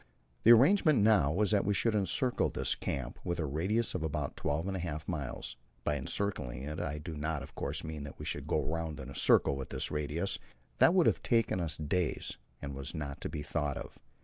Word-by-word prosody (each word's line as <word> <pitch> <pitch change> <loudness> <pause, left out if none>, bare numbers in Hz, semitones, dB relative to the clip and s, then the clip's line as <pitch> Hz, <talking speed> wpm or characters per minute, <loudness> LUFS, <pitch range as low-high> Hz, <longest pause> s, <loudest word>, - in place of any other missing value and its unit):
The 115 - +7
arrangement 145 - +6
now 105 -10 +5
was 100 +5 +2
that 100 -2 +3
we 100 0 +1
should 115 +1 +2
encircle 105 +5 +1
this - - +1
camp 65 -3 -4
with 85 - -2
a 80 - -1
radius 95 +11 0
of 90 - -2
about 75 -3 -2
twelve 75 +5 -1
and 95 - -2
a - - -2
half 80 -3 -4
miles. 70 -7 -4 0.3
By 75 - +1
encircling 70 -5 -2
I 75 +1 -2
do 80 +2 -6
not, 75 0 -2
of - - -11
course, - - -3
mean 80 -2 -5
that 70 - -9
we - - -7
should - - -3
go - - +1
round 80 -1 -3
in 65 0 -7
a - - -10
circle 70 - +4
with 65 -1 -5
this - - -2
radius; 75 +5 -1 0.4
that 175 - +6
would 180 - +5
have - - +3
taken 115 -5 +2
us 80 -4 -2
days, 80 -2 -1 0.3
and 70 -1 -4
was 70 +4 -5
not 75 -3 -5
to - - -3
be 75 -1 -4
thought 75 -1 -1
of. - - -9
80 Hz, 220 wpm, -32 LUFS, 75-100 Hz, 0.4 s, The